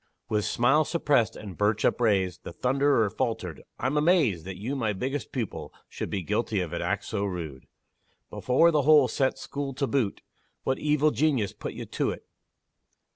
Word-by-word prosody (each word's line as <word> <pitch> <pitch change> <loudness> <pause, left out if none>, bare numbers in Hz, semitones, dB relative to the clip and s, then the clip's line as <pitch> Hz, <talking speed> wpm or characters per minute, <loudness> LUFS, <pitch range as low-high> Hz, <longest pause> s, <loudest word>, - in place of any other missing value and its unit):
With 105 -1 0
smile 135 +6 +3
suppressed, 145 - +1
and 100 -4 -8
birch 105 +1 +1
upraised, 95 -6 +1
The - - -7
thunderer 135 0 +2
faltered - - -3 0.2
"I'm 130 +4 -1
amazed 150 - +3
That 95 -1 -6
you, 120 +8 -3
my 110 -6 0
biggest 130 +8 -3
pupil, 120 -6 -4 0.2
should - - -5
Be 95 -3 -2
guilty 105 +2 -1
of 90 -2 -3
an 85 - -2
act 100 0 -1
so 105 -2 -2
rude! 85 -9 -5 0.6
Before 150 +7 +3
the 150 -2 +3
whole 145 -1 +6
set 135 0 0
school 140 -2 -5
to 140 - 0
boot 130 -7 -1 0.4
What 130 - 0
evil 150 0 +2
genius 130 -6 +1
put - - -6
you - - -6
to't?" - - -2
120 Hz, 170 wpm, -27 LUFS, 100-140 Hz, 0.6 s, whole